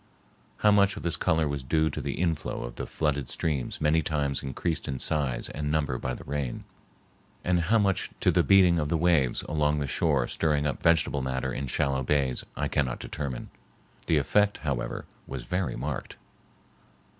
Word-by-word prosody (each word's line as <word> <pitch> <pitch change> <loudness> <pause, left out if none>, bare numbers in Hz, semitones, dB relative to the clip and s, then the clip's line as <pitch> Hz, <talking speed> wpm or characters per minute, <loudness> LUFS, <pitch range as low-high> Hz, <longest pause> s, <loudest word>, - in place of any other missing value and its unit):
How 105 - +4
much 100 -1 +4
of - - -7
this 85 - 0
color 80 -1 +1
was 70 -1 -2
due 80 +4 +1
to - - -4
the - - -3
inflow 85 -7 -1
of - - -6
the - - -5
flooded 70 -4 -1
streams 75 -7 -2
many 75 +2 +3
times 70 -3 -1
increased 75 +4 -3
in 65 - -2
size 70 -3 0
and 75 -1 -3
number 70 -5 0
by 65 -1 -3
the - - -10
rain, 70 -4 -3 0.8
and 90 -1 +2
how 90 +7 +3
much 100 -4 +1
to - - +4
the - - +4
beating 90 -3 +5
of 75 -1 -1
the 85 - +2
waves 80 -7 +2
along 75 -1 +1
the 70 - -1
shore 70 -1 +1
stirring 75 -2 +1
up 70 - -2
vegetable 80 -4 +3
matter 65 0 -2
in 70 - -3
shallow 65 +1 0
bays, 65 -1 +1
I - - 0
cannot 65 -4 0
determine. 65 -4 -5 0.6
The 80 - +3
effect, 105 +9 +2
however, 65 -4 -2 0.2
was 65 -3 -5
very 90 +4 -2
marked. - - -4
75 Hz, 180 wpm, -28 LUFS, 65-80 Hz, 0.8 s, beating